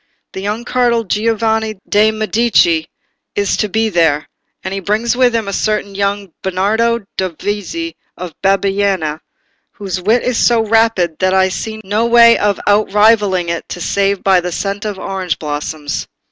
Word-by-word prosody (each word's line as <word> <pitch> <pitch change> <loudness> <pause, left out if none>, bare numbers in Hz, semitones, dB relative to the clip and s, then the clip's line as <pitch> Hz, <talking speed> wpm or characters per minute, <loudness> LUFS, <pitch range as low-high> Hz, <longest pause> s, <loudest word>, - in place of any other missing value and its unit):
The 190 - -5
young 210 +4 -3
cardinal 240 -2 +1
Giovanni 220 +1 0
de' 210 +1 +4
Medici 215 -7 +2 0.5
is 200 -1 +1
to 210 - -1
be 220 +3 +1
there, 165 -6 +1 0.4
and 190 - -4
he 195 - -2
brings 220 +5 0
with 250 -2 +3
him 225 -3 -1
a 200 - -3
certain 210 -1 -1
young 200 -1 -2
Bernardo 220 +5 0 0.2
Dovizi 205 - -3 0.2
of 180 -2 -7
Bibbiena, 195 -5 +1 0.5
whose 190 -4 -5
wit 220 +6 +2
is 250 -2 0
so 230 -2 +3
rapid 220 -7 +1
that 185 0 +2
I 190 0 +3
see 220 +3 -5
no 210 +4 0
way 235 0 +7
of 205 -1 0
out 205 0 +2
rivalling 205 -4 +3
it 170 0 -4
save 200 +2 -1
by 190 -2 +4
the 180 0 -4
scent 200 +4 -3
of 205 -2 -3
orange 190 -3 -3
blossoms." 150 0 -4
205 Hz, 160 wpm, -15 LUFS, 185-225 Hz, 0.5 s, way